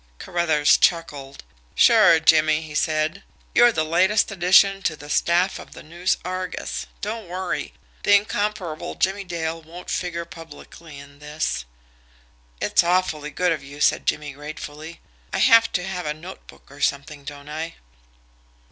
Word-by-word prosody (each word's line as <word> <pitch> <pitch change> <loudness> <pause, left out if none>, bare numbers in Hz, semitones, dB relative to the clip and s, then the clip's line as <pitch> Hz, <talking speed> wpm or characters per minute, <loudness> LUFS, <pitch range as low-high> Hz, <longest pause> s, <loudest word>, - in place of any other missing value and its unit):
Carruthers 160 - +2
chuckled. 145 -5 -1 0.3
"Sure, 165 - +6
Jimmie," 155 0 +4
he 155 -1 -10
said. 155 +4 0 0.3
"You're 240 0 +6
the 155 -7 -1
latest 190 +7 +2
addition 195 +1 +4
to 165 -5 -1
the 145 0 -10
staff 175 +3 +1
of - - -12
the - - -11
NEWS 175 +4 -1
ARGUS. 185 -1 -4
Don't 215 -1 -5
worry; 185 +1 -4 0.3
the 205 - +5
incomparable 205 -5 -2
Jimmie 195 +1 0
Dale 165 -2 -4
won't 170 +3 -10
figure 170 -1 -3
publicly 165 -1 -12
in 140 0 -14
this." 150 - -3 0.9
"It's - - +2
awfully 170 -4 0
good 175 +4 0
of 155 -4 -2
you," 140 +2 -11
said - - +2
Jimmie 150 -2 -1
gratefully. 150 +2 -9 0.3
"I - - -2
have 230 0 +5
to 180 - 0
have 180 -3 -4
a 150 - -2
notebook - - -13
or - - -13
something, 140 +1 -2
don't 145 0 -10
I?" 160 +2 -5
165 Hz, 145 wpm, -23 LUFS, 150-185 Hz, 0.9 s, Sure